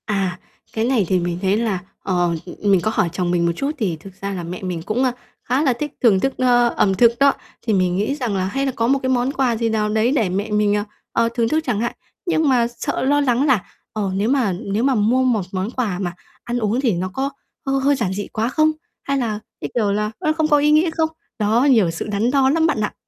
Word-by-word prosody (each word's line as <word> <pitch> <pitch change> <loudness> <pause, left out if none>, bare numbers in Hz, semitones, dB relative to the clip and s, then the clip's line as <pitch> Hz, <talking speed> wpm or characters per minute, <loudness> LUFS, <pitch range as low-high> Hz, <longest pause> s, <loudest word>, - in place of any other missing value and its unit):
À, 195 -3 -1 0.3
cái 220 0 0
này 240 -6 +2
thì 185 - +3
mình 175 0 -2
thấy 195 +1 +2
là, 220 -5 0 0.2
ờ, 175 -2 +1 0.2
ừ, 180 - -8
ừm, 205 - +2
mình 190 -3 +4
có 215 - 0
hỏi 175 - +1
chồng 175 -1 -1
mình 175 -1 +1
một 170 - +2
chút 275 +10 -1
thì 200 -10 -1
thực 190 +5 -13
ra 200 0 -3
là 180 -2 -4
mẹ 175 +2 -6
mình 180 -3 -3
cũng, 215 +9 -1
a, 255 - +2 0.3
khá 255 +4 0
là 265 -4 +3
thích 295 +5 -4
thưởng 210 -6 +5
thức, 270 +6 0
ơ, 245 -1 +4
ẩm 195 - +3
thực 230 +4 +5
đó, 280 0 +5 0.3
thì 220 - +2
mình 185 -2 +2
nghĩ 210 +9 0
rằng 245 -8 -2
là 185 - 0
hay 270 +8 -1
là 270 - 0
có 230 - +1
một 275 +2 +3
cái 260 - 0
món 255 +1 +1
quà 260 -4 +1
gì 230 0 0
nào 215 -1 0
đấy 220 +3 +2
để 220 -9 +1
mẹ 200 +4 -2
mình, 210 -1 +2
à, 205 0 -1 0.3
ờ, 230 0 +2
thưởng 230 -2 +1
thức 315 +1 +1
chẳng 225 -5 0
hạn. 235 +2 -1 0.3
Nhưng 320 -4 +2
mà 245 -3 +3
sợ - - -2
lo 290 +2 +3
lắng 255 -1 +2
là, 250 -10 +3 0.3
ờ, 205 -3 -2
nếu 205 +4 0
mà 255 -7 +2
nếu 200 +5 -2
mà 270 -1 +3
mua 235 +5 +2
một 240 -5 +2
món 190 +3 -2
quà 215 -8 -2
mà 175 -3 -3 0.3
ăn 240 +1 -2
uống 225 +3 0
thì 240 -6 +2
nó 180 +2 -2
có 270 +3 -1 0.4
hơi 270 0 +1
hơi 285 +1 +3
giản 210 -8 -1
dị 205 +1 -4
quá 225 +2 -2
không? 310 +4 +3 0.3
Hay 275 0 -1
là, 225 -5 -1 0.2
cái, - - -4
kiểu 215 -4 +2
là, 210 +1 -1
nó 310 - +1
không 315 -1 +1
có 295 -1 +4
ý 295 +1 +3
nghĩa 310 +3 +4
không? 320 -1 0 0.3
Đó, 220 +6 +3
nhiều 215 -10 +4
sự 165 - -5
đắn 210 +4 0
đo 270 -1 +3
lắm 320 +3 +3
bạn 225 - 0
ạ. 210 - -1
225 Hz, 270 wpm, -20 LUFS, 195-265 Hz, 0.4 s, thưởng